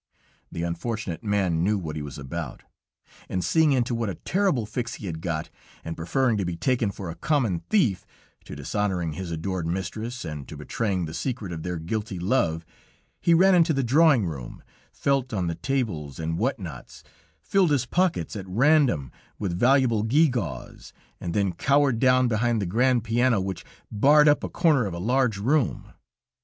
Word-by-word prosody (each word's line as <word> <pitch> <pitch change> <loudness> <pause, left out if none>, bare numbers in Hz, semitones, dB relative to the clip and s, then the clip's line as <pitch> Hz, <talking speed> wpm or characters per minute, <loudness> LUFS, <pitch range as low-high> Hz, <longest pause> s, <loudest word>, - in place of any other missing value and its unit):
The 85 - -4
unfortunate 90 +2 -4
man 95 -6 +1
knew 105 +3 +2
what 80 -5 -5
he 75 - -4
was 75 0 -7
about, 65 -2 -6 0.7
and 90 -1 -2
seeing 160 -2 +3
into 125 -2 +1
what 115 -2 -1
a 95 - -4
terrible 185 - 0
fix 120 +2 -4
he 105 - -9
had 80 -3 -5
got, 80 -3 -3 0.3
and 80 0 -4
preferring 115 +8 0
to 100 - -1
be 90 -1 -3
taken 120 +2 0
for 95 -3 -6
a - - -9
common 120 - 0
thief 135 - +2 0.4
to - - -8
dishonoring 95 -6 -2
his 90 +3 -6
adored 85 +1 -3
mistress 110 +7 -4
and 75 -4 -6
to - - -9
betraying 95 -6 -2
the 80 - -7
secret 115 -3 -4
of 80 -2 -5
their 90 +1 -3
guilty 105 +4 -4
love, 85 -4 0 0.5
he 170 - +4
ran 190 +3 +5
into 165 -2 +4
the 135 -1 0
drawing 135 - +4
room, 70 -8 -7 0.3
felt 135 -2 0
en 95 -3 0
the 85 - -1
tables 90 - -3
and 80 0 -3
what - - 0
nots, - - -9 0.4
filled 195 -3 +2
his 140 -4 +1
pockets 175 -1 0
at 95 -2 -6
random 120 - +3 0.3
with 95 -4 -2
valuable 125 +1 +3
gew 145 +9 +4
gaws, 90 - -5 0.3
and 85 - -4
then 100 -3 +1
cowered 140 +3 +2
down 130 0 +4
behind 120 0 +1
the 100 - -1
grand 120 +5 +2
piano, 115 0 +2
which 95 0 -4 0.3
barred 145 +7 +5
up 150 - +4
a - - -3
corner 150 - +2
of 90 - -5
a - - -5
large 120 +3 +1
room. 130 +5 0
110 Hz, 180 wpm, -25 LUFS, 85-130 Hz, 0.7 s, ran